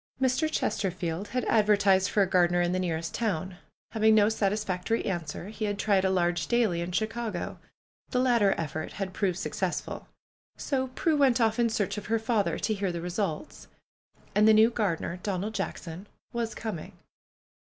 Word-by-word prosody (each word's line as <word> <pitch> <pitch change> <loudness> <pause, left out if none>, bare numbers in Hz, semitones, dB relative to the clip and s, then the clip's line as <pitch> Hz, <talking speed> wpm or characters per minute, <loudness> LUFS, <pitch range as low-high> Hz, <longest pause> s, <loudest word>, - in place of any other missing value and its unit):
Mr. 265 +4 +1
Chesterfield 185 - -2
had 250 +3 -2
advertised 205 -3 +4
for 205 - +3
a - - 0
gardener 175 -1 +3
in 175 0 +1
the 185 - 0
nearest 165 -2 -2
town. 190 -5 -2 0.3
Having 220 -1 +4
no 210 -1 +5
satisfactory 210 0 -1
answer, 175 0 -4
he 220 0 -4
had 205 -1 -2
tried 200 -2 +2
a 190 - +2
large 175 -4 +1
daily 220 -8 +2
in 170 +1 -4
Chicago. 220 0 -3 0.5
The 250 - 0
latter 235 -6 +3
effort 155 0 -4
had 195 -2 -4
proved 190 -4 0
successful. - - -3 0.5
So 265 -2 -1
Prue 320 -2 +2
went 265 -4 +4
off 225 0 +2
in 235 -1 +3
search 210 -3 -1
of 210 - -11
her 225 +1 +2
father 220 -6 0
to 220 - 0
hear 200 -3 -1
the 170 - -4
results. 180 - -4 0.7
And 210 +1 +4
the 220 - +7
new 220 +2 +6
gardener, 180 -5 -2
Donald 200 +2 -2
J - - 0
ackson, 170 +3 -9 0.3
was 235 -1 -2
coming. 210 -8 -5
205 Hz, 175 wpm, -28 LUFS, 180-225 Hz, 0.7 s, the